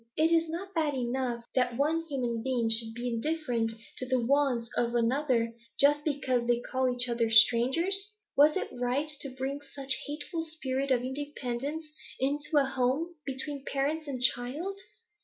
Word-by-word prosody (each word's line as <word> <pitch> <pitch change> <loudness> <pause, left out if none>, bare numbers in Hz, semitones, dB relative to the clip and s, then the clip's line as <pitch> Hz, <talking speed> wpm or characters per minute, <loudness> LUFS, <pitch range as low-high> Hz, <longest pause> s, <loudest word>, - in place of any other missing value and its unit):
Is 320 +2 +4
it 330 -1 +3
not 380 +4 -5
bad 310 -4 +1
enough 245 -1 -2
that 250 -2 +1
one 310 +4 +2
human 245 -5 -1
being 240 -2 0
should 225 0 +2
be 240 +1 -3
indifferent 245 -2 -1 0.3
to 255 - -3
the 255 0 +2
wants 250 -1 +2
of 235 0 0
another, 235 -1 +1 0.3
just 290 +1 +5
because 260 -5 0
they 240 0 +3
call 260 +1 0
each 245 0 0
other 235 -1 +1
strangers? 300 - +4 0.2
Was 300 +3 +6
it - - -3
right 250 +4 0
to 275 - -2
bring 270 +2 -3
such 275 -1 -3
a - - -4
hateful 300 +3 -4
spirit 275 -4 -2
of 250 -2 +2
independence 285 +2 -4 0.3
into 290 +3 0
a 280 - +5
home, 270 +6 0
between 275 +1 -4
parents 290 +3 -1
and 265 -3 -3
child? 290 +12 0
265 Hz, 165 wpm, -30 LUFS, 245-295 Hz, 0.3 s, Was